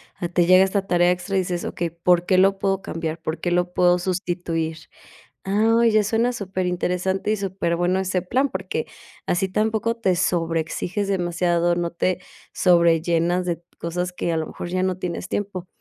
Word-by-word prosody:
ah, 175 Hz, -3 st, -3 dB
te 175 Hz, -1 st, +2 dB
llega 185 Hz, +1 st, +7 dB
esta 195 Hz, 0 st, 0 dB
tarea 175 Hz, -1 st, +3 dB
extra 180 Hz, +2 st, -3 dB
y -, -, +4 dB
dices: 180 Hz, -1 st, -2 dB
"Okey, 170 Hz, -1 st, -3 dB
¿por 175 Hz, +1 st, +2 dB
qué 185 Hz, 0 st, +3 dB
lo 195 Hz, +1 st, +4 dB
puedo 195 Hz, -1 st, 0 dB
cambiar? 165 Hz, 0 st, -4 dB
¿Por 160 Hz, 0 st, -4 dB
qué 175 Hz, -, -2 dB
lo 180 Hz, 0 st, 0 dB
puedo 180 Hz, 0 st, +4 dB
sustituir?". 175 Hz, -3 st, -2 dB, 0.7 s
Ah, 225 Hz, +4 st, +3 dB
ya 215 Hz, -1 st, +3 dB
suena 230 Hz, +4 st, +1 dB
superinteresante 185 Hz, 0 st, -1 dB
y 215 Hz, -, +1 dB
superbueno 185 Hz, -1 st, 0 dB
ese 185 Hz, -1 st, -1 dB
plan, 255 Hz, +9 st, 0 dB
porque 190 Hz, -4 st, -4 dB, 0.4 s
así 190 Hz, +2 st, 0 dB
tampoco 220 Hz, +3 st, 0 dB
te 190 Hz, -6 st, +1 dB
sobreexiges 170 Hz, +2 st, -1 dB
demasiado, 175 Hz, -2 st, +1 dB
no 170 Hz, -1 st, -2 dB
te 180 Hz, +1 st, -1 dB, 0.3 s
sobrellenas 170 Hz, 0 st, +3 dB
de 170 Hz, -1 st, -2 dB, 0.2 s
cosas 180 Hz, +2 st, -3 dB
que 175 Hz, -1 st, -2 dB
a -, -, 0 dB
lo 160 Hz, -, -2 dB
mejor -, -, -7 dB
ya 185 Hz, +1 st, 0 dB
no 185 Hz, -1 st, 0 dB
tienes 180 Hz, 0 st, -4 dB
tiempo. 190 Hz, -3 st, -3 dB
180 Hz, 175 wpm, -23 LUFS, 175-195 Hz, 0.7 s, llega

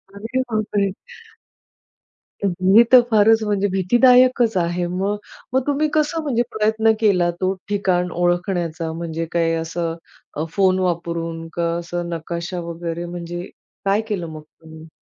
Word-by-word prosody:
अरे 225 Hz, +6 st, -3 dB
बापरे! 205 Hz, -2 st, 0 dB, 1.5 s
हे 190 Hz, +3 st, +5 dB
तर 255 Hz, -1 st, +9 dB
फारच 220 Hz, +1 st, +5 dB
म्हणजे 205 Hz, -1 st, 0 dB
भीतीदायकच 240 Hz, +4 st, +4 dB
आहे 175 Hz, 0 st, 0 dB
मग. 195 Hz, +3 st, -1 dB, 0.4 s
मग 260 Hz, -, +3 dB
तुम्ही 290 Hz, +2 st, +1 dB
कसं 310 Hz, +2 st, +1 dB
म्हणजे 245 Hz, -5 st, +1 dB
प्रयत्न 220 Hz, +1 st, +3 dB
केला 190 Hz, -6 st, +3 dB
तो 185 Hz, 0 st, +1 dB, 0.2 s
ठिकाण 185 Hz, -3 st, 0 dB
ओळखण्याचा. 175 Hz, -2 st, -1 dB
म्हणजे 165 Hz, 0 st, -4 dB
काय 165 Hz, -1 st, +1 dB
असं 165 Hz, 0 st, -3 dB, 0.4 s
अ, 155 Hz, -, -1 dB
फोन 190 Hz, 0 st, +2 dB
वापरून? 170 Hz, -2 st, -2 dB
का 170 Hz, -1 st, -1 dB
असं 175 Hz, 0 st, -4 dB
नकाशा 170 Hz, +2 st, -4 dB
वगैरे 170 Hz, 0 st, -4 dB
म्हणजे 175 Hz, 0 st, -6 dB, 0.4 s
काय 200 Hz, +2 st, +2 dB
केलं 185 Hz, -5 st, -2 dB
मग 155 Hz, -1 st, -8 dB
तुम्ही? 160 Hz, +1 st, -15 dB
180 Hz, 130 wpm, -21 LUFS, 170-215 Hz, 1.5 s, तर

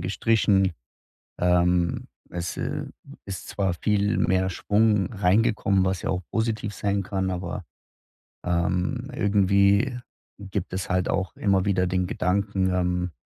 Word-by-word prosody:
gestrichen. 95 Hz, 0 st, +2 dB, 0.7 s
Ähm, 90 Hz, -1 st, +2 dB, 0.2 s
es, 85 Hz, 0 st, -4 dB
äh, -, -, -3 dB, 0.4 s
ist 95 Hz, -2 st, -6 dB
zwar 95 Hz, -3 st, -1 dB
viel 105 Hz, +3 st, +1 dB
mehr 95 Hz, +1 st, +2 dB
Schwung 105 Hz, +1 st, +1 dB
reingekommen, 100 Hz, 0 st, +2 dB
was 95 Hz, -1 st, -1 dB
ja -, -, -3 dB
auch 90 Hz, 0 st, -1 dB
positiv 110 Hz, -2 st, -1 dB
sein 100 Hz, -1 st, -1 dB
kann, 95 Hz, -1 st, -2 dB
aber, 90 Hz, +1 st, -4 dB, 0.8 s
ähm, 90 Hz, +9 st, -1 dB
irgendwie 100 Hz, +4 st, +3 dB, 0.4 s
gibt 100 Hz, -2 st, -5 dB
es 95 Hz, 0 st, -3 dB
halt 90 Hz, -1 st, 0 dB
auch 95 Hz, -1 st, -2 dB
immer 100 Hz, -2 st, +2 dB
wieder 95 Hz, -2 st, +1 dB
den 90 Hz, 0 st, 0 dB
Gedanken, 95 Hz, +1 st, 0 dB
ähm: 90 Hz, -1 st, 0 dB
95 Hz, 125 wpm, -25 LUFS, 90-100 Hz, 0.8 s, irgendwie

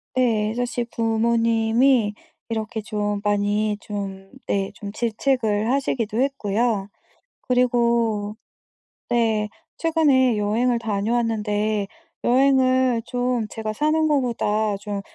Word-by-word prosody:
네. 220 Hz, -4 st, +1 dB
사실 245 Hz, 0 st, -2 dB
부모님이 230 Hz, +1 st, +2 dB, 0.4 s
이렇게 220 Hz, -1 st, -3 dB
좀 205 Hz, -1 st, -2 dB
많이 205 Hz, +1 st, +1 dB
좀 195 Hz, -2 st, -6 dB, 0.2 s
네 195 Hz, -1 st, -1 dB
좀 200 Hz, -1 st, -7 dB
질책을 225 Hz, -1 st, 0 dB
하시기도 240 Hz, -5 st, -1 dB
했고요. 225 Hz, -5 st, 0 dB, 0.5 s
그리고 235 Hz, -4 st, +1 dB, 0.7 s
네 220 Hz, -3 st, +1 dB, 0.3 s
최근에 285 Hz, -7 st, +3 dB
여행을 230 Hz, +4 st, +1 dB
다녀왔는데 215 Hz, -1 st, -1 dB, 0.4 s
여행을 255 Hz, -1 st, +3 dB
좀 245 Hz, -3 st, -1 dB
제가 220 Hz, 0 st, -4 dB
사는 310 Hz, +6 st, +1 dB
거보다 220 Hz, -7 st, +1 dB
좀 205 Hz, 0 st, -4 dB
225 Hz, 210 characters per minute, -23 LUFS, 210-245 Hz, 0.7 s, 최근에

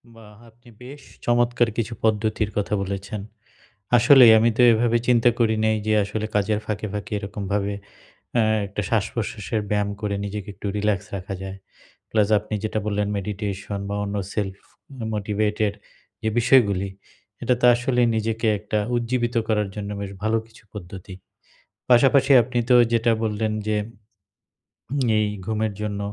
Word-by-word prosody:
বাহ! 105 Hz, -2 st, -15 dB
আপনি 120 Hz, +2 st, -21 dB
বেশ 140 Hz, +3 st, -10 dB, 0.2 s
চমৎকার 120 Hz, 0 st, +2 dB
কিছু 115 Hz, 0 st, -2 dB
পদ্ধতির 110 Hz, -1 st, +1 dB
কথা 105 Hz, 0 st, -1 dB
বলেছেন। 100 Hz, +1 st, -5 dB, 0.8 s
আসলেই 120 Hz, -1 st, +8 dB
আমি 115 Hz, +2 st, +3 dB
তো 125 Hz, -, +4 dB
এভাবে 120 Hz, +1 st, +2 dB
চিন্তা 120 Hz, 0 st, +5 dB
করি 115 Hz, -2 st, +3 dB
নাই 110 Hz, 0 st, +2 dB
যে, 110 Hz, -, +2 dB
আসলে 105 Hz, +2 st, -3 dB
কাজের 105 Hz, +1 st, +1 dB
ফাঁকে, 105 Hz, 0 st, -3 dB
ফাঁকে 105 Hz, 0 st, -5 dB
এরকমভাবে। 100 Hz, 0 st, -3 dB, 0.6 s
অ্যা 115 Hz, -, +4 dB, 0.2 s
একটা 100 Hz, +1 st, -4 dB
শ্বাসপ্রশ্বাসের 110 Hz, 0 st, -2 dB
ব্যায়াম 105 Hz, -1 st, 0 dB
করে 105 Hz, -1 st, -1 dB
নিজেকে 100 Hz, 0 st, -5 dB
একটু 100 Hz, -, -7 dB
relax 105 Hz, -2 st, +1 dB, 0.2 s
রাখা 95 Hz, +1 st, -5 dB
যায়। 95 Hz, 0 st, -6 dB, 0.5 s
Plus 105 Hz, -2 st, +2 dB
আপনি 105 Hz, +1 st, -6 dB
যেটা 110 Hz, 0 st, -1 dB
বললেন 105 Hz, 0 st, -1 dB
meditation 100 Hz, 0 st, -4 dB
বা 100 Hz, -, -3 dB
অন্য 100 Hz, 0 st, -4 dB, 0.2 s
self 95 Hz, -2 st, -3 dB, 0.6 s
motivated 105 Hz, 0 st, 0 dB, 0.5 s
যে, 110 Hz, -, 0 dB
বিষয়গুলি 115 Hz, -6 st, +3 dB, 0.5 s
এটা 125 Hz, -, +2 dB
তো -, -, +4 dB
আসলে 125 Hz, 0 st, 0 dB, 0.2 s
নিজেকে 110 Hz, +1 st, -1 dB
একটা 105 Hz, +1 st, -2 dB, 0.2 s
উজ্জীবিত 120 Hz, 0 st, -1 dB
করার 105 Hz, -2 st, +1 dB
জন্য 105 Hz, -1 st, -5 dB
বেশ 100 Hz, -1 st, -5 dB
ভালো 110 Hz, +1 st, +1 dB
কিছু 115 Hz, +1 st, -19 dB
পদ্ধতি। 95 Hz, -1 st, -9 dB, 0.8 s
পাশাপাশি 135 Hz, +3 st, +5 dB
আপনি 125 Hz, +1 st, -3 dB
তো 125 Hz, -, +7 dB, 0.2 s
যেটা 115 Hz, 0 st, +3 dB
বললেন 110 Hz, 0 st, -1 dB, 0.2 s
যে। 105 Hz, -, +1 dB, 1.4 s
এই 105 Hz, -, +1 dB, 0.2 s
ঘুমের 110 Hz, -1 st, -1 dB
জন্য 105 Hz, -1 st, -3 dB
105 Hz, 145 wpm, -23 LUFS, 100-115 Hz, 1.4 s, আসলেই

